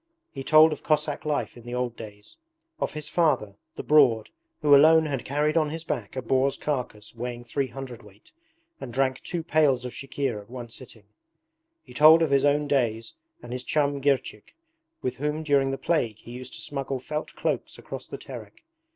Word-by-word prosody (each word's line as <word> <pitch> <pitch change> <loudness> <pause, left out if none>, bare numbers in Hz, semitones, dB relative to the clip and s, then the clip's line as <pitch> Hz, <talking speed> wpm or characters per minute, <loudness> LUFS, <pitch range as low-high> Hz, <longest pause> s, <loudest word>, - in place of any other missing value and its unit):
He 135 - -7
told 155 +2 +7
of - - -9
Cossack 150 -1 0
life 150 -1 -1
in 120 - -13
the 120 +1 -6
old 125 -1 -2
days: 105 -2 -11 0.4
of - - -2
his 150 -1 -6
father, 140 - +1 0.2
'The - - -6
Broad', 135 -8 +4 0.3
who 145 -1 +7
alone 160 +3 +6
had 140 -4 -3
carried 150 +3 0
on 155 -2 +2
his 160 +1 -5
back 120 -9 -4
a 130 - -3
boar's 135 +3 +1
carcass 125 -7 -4
weighing 120 0 -5
three 135 +3 -2
hundredweight, 120 -6 -11 0.5
and 120 - -7
drank 130 +1 0
two 170 -2 -4
pails 145 -6 +2
of 125 - -4
chikhir 135 -5 -3
at 100 - -19
one 120 -1 -8
sitting. 115 -2 -12 0.8
He - - -15
told 160 +2 +7
of 155 - 0
his 140 0 +4
own 145 +1 +2
days 115 -5 0 0.3
and - - -7
his 125 0 -4
chum 140 -1 0
Girchik, 135 -6 -1 0.5
with 125 0 -2
whom 150 +3 -2
during 140 -3 +2
the 135 - -2
plague 120 -12 0
he 120 - -13
used 125 +1 -7
to - - -7
smuggle 135 -1 -3
felt 150 +4 -5
cloaks - - -2
across - - -8
the - - -7
Terek. - - -11
135 Hz, 190 wpm, -26 LUFS, 120-150 Hz, 0.8 s, told